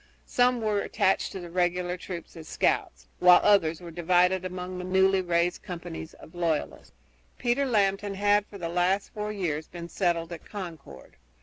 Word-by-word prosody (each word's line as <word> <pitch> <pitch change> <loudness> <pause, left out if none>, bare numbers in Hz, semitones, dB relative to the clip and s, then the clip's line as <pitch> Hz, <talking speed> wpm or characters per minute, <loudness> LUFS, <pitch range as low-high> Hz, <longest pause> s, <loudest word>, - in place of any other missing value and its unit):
Some 245 -1 +2
were 210 -2 +1
attached 200 -2 +1
to 190 - -6
the 175 -2 -9
regular 180 0 0
troops 180 -2 -8
as 160 -2 -10
scouts, - - 0
while 180 0 +8
others 170 -5 +3
were 170 -1 -9
divided 180 +2 +2
among 180 0 -5
the - - -5
newly 190 +1 +3
raised 175 0 0
companies 170 -3 -7
of - - -15
loyalists. 170 -3 -2 0.4
Peter 255 +3 +1
Lambton 200 -3 +1
had 205 +1 +2
for 200 - -10
the 170 -3 -4
last 180 +3 0
four 210 0 -3
years 160 -7 -3
been 170 -1 -8
settled 170 -2 0
at 165 - -9
Concord. 170 - -9
180 Hz, 170 wpm, -27 LUFS, 170-200 Hz, 0.4 s, while